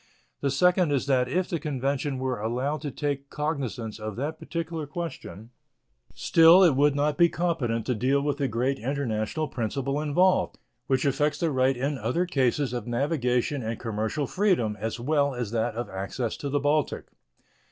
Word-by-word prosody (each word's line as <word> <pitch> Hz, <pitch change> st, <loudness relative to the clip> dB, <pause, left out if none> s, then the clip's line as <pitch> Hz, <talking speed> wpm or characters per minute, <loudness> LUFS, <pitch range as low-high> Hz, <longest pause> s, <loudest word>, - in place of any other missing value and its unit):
The 140 Hz, -, 0 dB
second 180 Hz, +4 st, +3 dB
is 140 Hz, -3 st, +1 dB
that 130 Hz, -3 st, +2 dB
if 180 Hz, +6 st, 0 dB
the 170 Hz, -, -2 dB
convention 140 Hz, -1 st, -2 dB
were 130 Hz, -3 st, -2 dB
allowed 125 Hz, +7 st, -2 dB
to 150 Hz, -, -3 dB
take 140 Hz, -1 st, -3 dB
cognizance 135 Hz, -8 st, -3 dB
of 110 Hz, -1 st, -5 dB
that 145 Hz, +6 st, -4 dB
particular 165 Hz, -2 st, -4 dB
question, 140 Hz, -, -7 dB, 0.6 s
still 165 Hz, +3 st, +6 dB
it 165 Hz, -7 st, +5 dB
would 145 Hz, +1 st, +3 dB
not 145 Hz, 0 st, 0 dB
be 170 Hz, 0 st, +6 dB
competent 145 Hz, -11 st, -1 dB
to 125 Hz, -, 0 dB
deal 130 Hz, +5 st, +1 dB
with 145 Hz, -1 st, -1 dB
the 140 Hz, -, +1 dB
great 130 Hz, +4 st, -1 dB
international 130 Hz, +2 st, -2 dB
principle 135 Hz, +4 st, -2 dB
involved, 180 Hz, +5 st, +2 dB, 0.3 s
which 130 Hz, +1 st, +1 dB
affects 145 Hz, +2 st, +1 dB
the 165 Hz, -2 st, +1 dB
right 130 Hz, -1 st, +2 dB
in 140 Hz, +2 st, -2 dB
other 125 Hz, +11 st, 0 dB
cases 135 Hz, -4 st, 0 dB
of 120 Hz, 0 st, -4 dB
navigation 125 Hz, +1 st, 0 dB
and 115 Hz, 0 st, -4 dB
commercial 110 Hz, +5 st, -2 dB
freedom, 175 Hz, -, +1 dB
as 115 Hz, +2 st, -3 dB
well 140 Hz, +1 st, +1 dB
as 120 Hz, -4 st, -3 dB
that 115 Hz, -1 st, -1 dB
of 120 Hz, +1 st, -3 dB
access 100 Hz, +5 st, -4 dB
to 140 Hz, -, -4 dB
the 145 Hz, +1 st, +1 dB
Baltic. 145 Hz, +1 st, 0 dB
140 Hz, 175 wpm, -26 LUFS, 120-150 Hz, 0.6 s, still